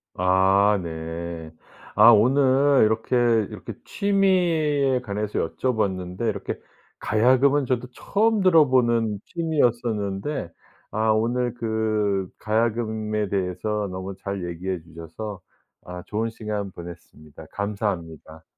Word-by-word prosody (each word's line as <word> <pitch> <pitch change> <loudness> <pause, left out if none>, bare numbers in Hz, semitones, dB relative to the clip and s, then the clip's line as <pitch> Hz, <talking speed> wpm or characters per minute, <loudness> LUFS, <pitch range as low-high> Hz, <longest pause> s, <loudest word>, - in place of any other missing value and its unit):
아 95 +3 +3
네. 80 0 -6 0.4
아 110 +3 +8
오늘 135 +4 +4
이렇게, 110 +3 0 0.3
이렇게 - - -8
취미에 170 -9 +2
관해서 105 -2 -3
여쭤 125 -3 -1
봤는데 95 +1 -2
이렇게 100 -3 -3 0.4
가야금은 130 +6 +3
저도 125 0 -1
처음 220 0 +1
들어보는 125 - +3
취미였었는데 120 - -1 0.4
아 110 +1 0
오늘 120 +2 0
그 110 -4 -1
가야금에 110 -2 -1
대해서 100 +2 -2
너무 95 +1 -6
잘 100 -2 -5
얘기해 90 +1 -4
주셔서 85 +5 -8 0.5
아 90 0 -8
좋은 110 +2 -2
시간 105 -3 -5
보냈습니다. 80 -3 -12
감사합니다. 90 -6 -4
110 Hz, 250 characters per minute, -24 LUFS, 95-125 Hz, 0.5 s, 아